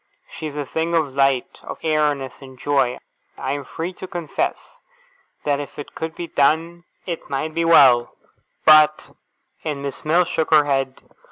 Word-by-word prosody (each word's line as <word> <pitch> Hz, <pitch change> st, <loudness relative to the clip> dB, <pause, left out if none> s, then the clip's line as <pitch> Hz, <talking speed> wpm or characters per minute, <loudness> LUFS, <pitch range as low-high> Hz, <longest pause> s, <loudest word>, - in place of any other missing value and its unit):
She 155 Hz, -, -6 dB
is 145 Hz, -, -8 dB
a 145 Hz, -, -2 dB
thing 160 Hz, +5 st, -2 dB
of 155 Hz, -5 st, 0 dB
light, 135 Hz, -2 st, +1 dB
and -, -, -8 dB
airiness, 150 Hz, -4 st, 0 dB
and 130 Hz, -1 st, -12 dB
joy. 135 Hz, -2 st, +1 dB, 0.4 s
I 130 Hz, -, -3 dB
am 145 Hz, 0 st, -3 dB
free 165 Hz, +6 st, -5 dB
to 185 Hz, -, -9 dB
confess 175 Hz, -, -4 dB, 0.6 s
that 145 Hz, -1 st, 0 dB
if 145 Hz, -, -8 dB
it 145 Hz, -, -8 dB
could 160 Hz, 0 st, -5 dB
be 175 Hz, -, -5 dB
done, 165 Hz, +3 st, +1 dB, 0.2 s
it 170 Hz, -3 st, -5 dB
might 155 Hz, +3 st, -2 dB
be 165 Hz, +1 st, 0 dB
well, 130 Hz, -7 st, +6 dB, 0.5 s
but 155 Hz, 0 st, +6 dB, 0.3 s
' -, -, -41 dB
And 145 Hz, -3 st, -4 dB
Miss 140 Hz, -1 st, -6 dB
Mills 170 Hz, +3 st, +3 dB
shook 160 Hz, -3 st, -1 dB
her 150 Hz, -2 st, +5 dB
head. 135 Hz, -2 st, -1 dB
150 Hz, 175 wpm, -21 LUFS, 140-165 Hz, 0.6 s, well